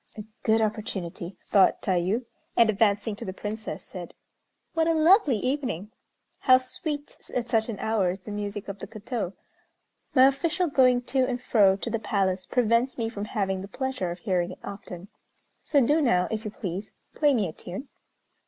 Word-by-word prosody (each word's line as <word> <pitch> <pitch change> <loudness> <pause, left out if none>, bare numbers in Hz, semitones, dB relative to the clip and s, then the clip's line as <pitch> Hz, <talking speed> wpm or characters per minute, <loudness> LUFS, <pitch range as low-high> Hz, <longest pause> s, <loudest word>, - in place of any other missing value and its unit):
"A 210 - -5 0.2
good 220 0 +3
opportunity," 195 -5 -4
thought 195 -2 +4
Tayû; 190 +6 +1 0.3
and, 230 -2 +6
advancing 205 0 +1
to - - -7
the 185 - -5
Princess, 215 +1 -5
said: 180 -3 -8 0.6
"What 325 -1 +2
a 330 - +3
lovely 320 - +5
evening! 250 - -2 0.5
How 255 -1 +6
sweet 290 +2 -5 0.2
at 240 -1 -1
such 220 0 +2
an 215 - -3
hour 215 -4 +1
is 185 +2 -4
the 210 - -8
music 205 0 -4
of 200 0 -6
the - - -7
koto! 215 -2 -4 0.8
My 260 -1 +8
official 310 +7 +2
going 255 -3 +4
to 260 +1 +1
and 250 -1 -2
fro 205 -6 +4
to 230 - -4
the 230 - 0
palace 190 -3 0
prevents 245 +1 +2
me 225 -2 -1
from 210 -3 -5
having 195 -3 -1
the 195 - -7
pleasure 260 -5 -3
of 170 - -4
hearing 180 -1 0
it - - -14
often; 200 -2 -8 0.5
so 290 - +3
do 300 +5 +3
now, 180 -10 +3
if 220 0 -3
you - - -2
please, 200 0 -6 0.2
play 290 -3 +3
me 210 -5 +1
a 155 - -7
tune." 190 - -7
220 Hz, 180 wpm, -27 LUFS, 195-255 Hz, 0.8 s, My